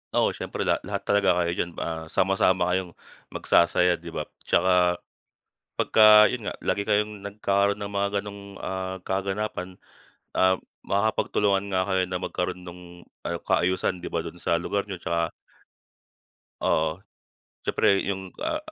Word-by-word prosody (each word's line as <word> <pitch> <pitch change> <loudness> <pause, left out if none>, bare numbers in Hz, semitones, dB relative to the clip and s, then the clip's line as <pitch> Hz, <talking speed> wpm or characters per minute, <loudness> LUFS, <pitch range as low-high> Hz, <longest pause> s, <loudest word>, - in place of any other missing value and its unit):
Oo, - - +3
syempre - - -4
lahat, - - +1
lahat - - -3
talaga 100 -1 +2
kayo 85 - 0
diyan, 85 0 -2
ah, 80 -1 -4
sama-sama 95 -1 +2
kayong 90 -2 -2 0.3
magsasaya, 85 0 +3
di 85 - -12
ba? 80 - -3 0.2
Tsaka, 90 -1 +3 0.8
pagka 110 -1 +7
yun 115 -5 -4
nga, - - -4
lagi 100 - -1
kayong 105 0 +1
nagkaroon 100 0 0
ng 100 0 -6
mga 100 0 +1
ganong, 100 -1 -10
ah, 95 0 -4
kaganapan, 95 -1 -3 0.6
um, 95 0 +4 0.3
makakapagtulungan 100 -1 +1
nga 95 0 +2
kayo 95 -1 +2
na 90 - -2
magkaroon 90 0 -3
nung 90 0 -10 0.5
ayu - - -1
kaayusan, 90 +1 +1
di - - -5
ba, 85 - 0
dun 85 +1 -9
sa 85 - +1
lugar 100 +3 -1
niyo 95 - -4
tsaka 85 0 -1 1.3
Oo. 80 +1 +1 0.6
Siyempre 100 - +2
yung, 95 -1 -4
ah, 315 0 0
95 Hz, 145 wpm, -26 LUFS, 90-100 Hz, 1.3 s, pagka